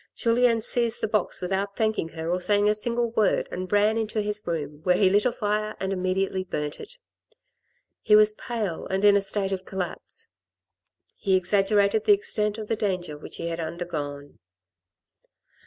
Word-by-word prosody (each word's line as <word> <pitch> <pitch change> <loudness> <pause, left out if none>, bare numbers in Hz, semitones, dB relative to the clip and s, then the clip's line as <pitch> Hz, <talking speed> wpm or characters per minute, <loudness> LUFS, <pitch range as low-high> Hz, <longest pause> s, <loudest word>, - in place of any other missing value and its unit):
Julien 230 -1 +2
seized 235 0 0
the - - 0
box 210 -2 -1
without 195 +2 -2
thanking 220 -7 0
her 160 0 -6
or 180 +1 0
saying 205 +2 +2
a 210 - +4
single 235 +2 -1
word, 220 -3 +1
and 185 0 -5
ran 210 +2 +3
into 220 0 -2
his 210 0 -2
room, 150 -3 -4
where 180 +1 +2
he 190 -2 +4
lit 205 +4 +3
a - - +1
fire 215 -1 -2
and 190 0 -2
immediately 185 0 -1
burnt 150 -5 -4
it. - - -10 1.0
He 210 - +5
was 215 0 +6
pale 215 -7 -4
and 190 +2 0
in 205 -1 +7
a 200 - +3
state 195 0 -2
of 190 -1 -3
collapse. 190 - -6 0.9
He 195 -2 +1
exaggerated 200 +3 +2
the - - +7
extent 220 - -1
of 215 -1 -6
the 225 - 0
danger 185 -7 -2
which 150 - -9
he 170 - -4
had 165 0 -4
undergone. 155 -4 -5
200 Hz, 175 wpm, -25 LUFS, 180-215 Hz, 1.0 s, in